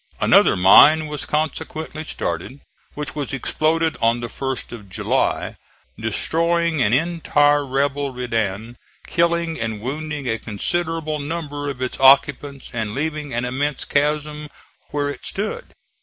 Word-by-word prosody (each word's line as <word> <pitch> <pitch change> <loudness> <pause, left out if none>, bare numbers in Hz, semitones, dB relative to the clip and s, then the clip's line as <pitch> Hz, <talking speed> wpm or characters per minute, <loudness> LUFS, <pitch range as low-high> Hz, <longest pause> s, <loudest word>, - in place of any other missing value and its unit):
Another - - +5
mine 150 +12 +7
was 150 -1 -5
consequently 155 0 -3
started 125 - -4 0.3
which 150 0 -5
was 145 -2 -4
exploded 160 +4 0
on 115 +1 +3
the 120 0 -5
1st 135 +1 -4
of 105 -5 -10
July, 90 - -1 0.4
destroying 165 +8 0
an 105 - +3
entire 145 0 +2
rebel 140 +1 -1
redan, 115 -2 -3 0.3
killing 170 -1 0
and 110 -2 -3
wounding 145 +3 -4
a 115 -1 -1
considerable 155 - -2
number 145 -1 -4
of 130 -2 -4
its 125 - -4
occupants 140 0 +3
and 110 -2 -3
leaving 150 0 -3
an 120 +1 -1
immense 135 +3 -2
chasm 150 +1 -1 0.4
where 145 -1 -1
it 145 - -6
stood. 210 +2 -4
145 Hz, 130 wpm, -21 LUFS, 125-155 Hz, 0.4 s, mine